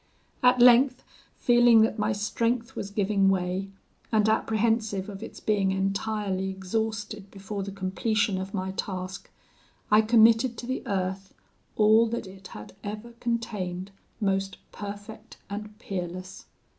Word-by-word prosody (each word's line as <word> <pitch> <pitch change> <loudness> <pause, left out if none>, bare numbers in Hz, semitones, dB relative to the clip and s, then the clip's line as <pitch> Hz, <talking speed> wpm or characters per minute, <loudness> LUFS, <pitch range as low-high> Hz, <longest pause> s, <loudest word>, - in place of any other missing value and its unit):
At 250 0 +5
length, 250 +2 +6 0.3
feeling 240 -2 +5
that 220 0 +1
my 210 +2 +1
strength 230 +3 -1
was 200 - -4
giving 200 -1 +2
way, 190 +1 -1 0.4
and 215 -1 +3
apprehensive 220 -2 +1
of 195 0 -8
its - - -8
being 200 -3 +1
entirely 195 0 -1
exhausted 210 +1 -3
before 200 +1 -6
the 200 +1 -5
completion 195 +1 0
of 190 +1 -6
my 190 -2 -3
task, 190 -1 -5 0.6
I 210 +1 +7
committed 225 +2 +4
to 240 - -6
the 260 +2 -2
earth 190 -1 -3 0.4
all 220 +2 +5
that 235 0 -3
it 190 0 -11
had 105 -9 -10
ever 210 +3 -6
contained 200 -6 -3 0.3
most 195 -2 -1
perfect 205 +1 -9
and 210 +1 -6
peerless. 185 -3 -6
205 Hz, 130 wpm, -27 LUFS, 190-225 Hz, 0.6 s, I